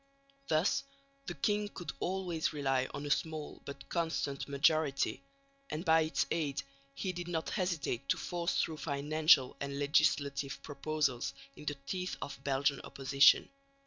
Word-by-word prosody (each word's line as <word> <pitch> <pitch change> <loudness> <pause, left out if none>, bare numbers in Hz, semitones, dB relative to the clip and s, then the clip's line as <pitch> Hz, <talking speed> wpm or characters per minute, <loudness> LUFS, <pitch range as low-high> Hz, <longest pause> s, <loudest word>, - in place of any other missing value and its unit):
Thus 155 +5 +2 0.4
the 175 - -4
king 205 +7 0
could 175 - -6
always 180 -4 -1
rely 135 -3 +1
on 145 - -5
a 145 - -2
small 155 0 -2
but 140 - -8
constant 160 -5 -1
majority, 140 0 +2 0.5
and 155 +4 -4
by 160 -1 +6
its 155 0 +1
aid 150 -4 -1 0.3
he 190 - -2
did 175 0 -5
not 165 -2 -2
hesitate 155 -8 -2
to - - +3
force 175 -1 -1
through 160 -1 0
financial 145 -1 +3
and 140 0 -4
legislative 140 -1 +2
proposals 145 -3 -1 0.2
in - - -11
the 145 - -1
teeth 180 +6 -3
of 140 -1 -7
Belgian 140 0 +1
opposition. 140 +1 +5
150 Hz, 145 wpm, -33 LUFS, 140-165 Hz, 0.5 s, by